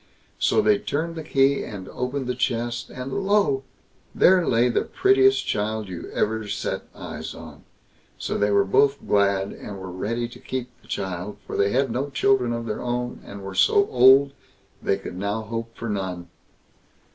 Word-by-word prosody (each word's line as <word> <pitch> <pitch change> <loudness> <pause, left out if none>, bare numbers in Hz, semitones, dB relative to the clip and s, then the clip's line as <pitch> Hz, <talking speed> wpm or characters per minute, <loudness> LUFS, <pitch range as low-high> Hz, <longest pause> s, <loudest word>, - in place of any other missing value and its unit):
So 215 - +3
they 210 -1 +4
turned 165 -3 -2
the 160 - -4
key 140 -2 +2
and 95 -4 -7
opened 130 +2 -3
the 125 - -1
chest, 120 0 -2
and 130 +1 -6
lo! 195 -9 +2 0.5
there 180 -2 +5
lay 120 +1 +3
the 120 - +1
prettiest 395 0 +3
child 105 0 -2
you 90 -2 -7
ever 110 0 -1
set - - -3
eyes - - -7
on. - - -12 0.5
So - - -3
they 105 0 +2
were 100 -1 +3
both 140 +8 +2
glad, 100 -1 +2
and 100 - -8
were 95 -1 -7
ready 115 +6 -2
to - - -13
keep 130 -1 -4
the - - -22
child, 95 +1 -4
for - - -6
they 100 - +2
had 130 +1 +1
no 130 +5 -2
children 135 -3 +2
of 115 0 -3
their 110 -2 -3
own, 125 0 -3
and 100 0 -9
were 95 0 -6
so 200 - +4
old, 130 +2 +6 0.5
they 95 - +1
could 95 -2 -8
now 100 +3 -2
hope 115 +1 -6
for 115 - -5
none. 95 -4 -4
120 Hz, 180 wpm, -24 LUFS, 100-135 Hz, 0.5 s, old